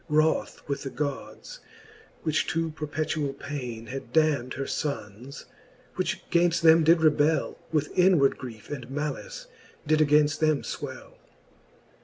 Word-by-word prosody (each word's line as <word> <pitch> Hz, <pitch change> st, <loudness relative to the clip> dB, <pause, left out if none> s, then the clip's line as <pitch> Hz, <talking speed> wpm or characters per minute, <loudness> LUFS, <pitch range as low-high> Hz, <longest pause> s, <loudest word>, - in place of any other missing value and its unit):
Wroth 155 Hz, +1 st, +1 dB
with 140 Hz, -1 st, -2 dB
the 135 Hz, -, -4 dB
Gods, 145 Hz, -, -5 dB, 0.6 s
which 155 Hz, -2 st, 0 dB
to 165 Hz, 0 st, -1 dB
perpetuall 150 Hz, -2 st, -2 dB
paine 125 Hz, -6 st, -6 dB
Had 135 Hz, +3 st, -7 dB
damn'd 150 Hz, -6 st, +2 dB
her 135 Hz, -, -3 dB
fonnes, 130 Hz, -3 st, -5 dB, 0.5 s
which -, -, -3 dB
gainft: 170 Hz, 0 st, +3 dB
them 165 Hz, 0 st, +6 dB
did 165 Hz, +1 st, +5 dB
rebell, 155 Hz, 0 st, +2 dB
With 150 Hz, -2 st, -1 dB
inward 180 Hz, -7 st, +4 dB
griefe 115 Hz, -3 st, -9 dB
and 130 Hz, -4 st, -6 dB
malice 150 Hz, -, -4 dB, 0.4 s
did 155 Hz, +1 st, +2 dB
againft 150 Hz, 0 st, +3 dB
them 155 Hz, -2 st, +2 dB
fwell. -, -, -7 dB
150 Hz, 130 wpm, -27 LUFS, 140-160 Hz, 0.6 s, them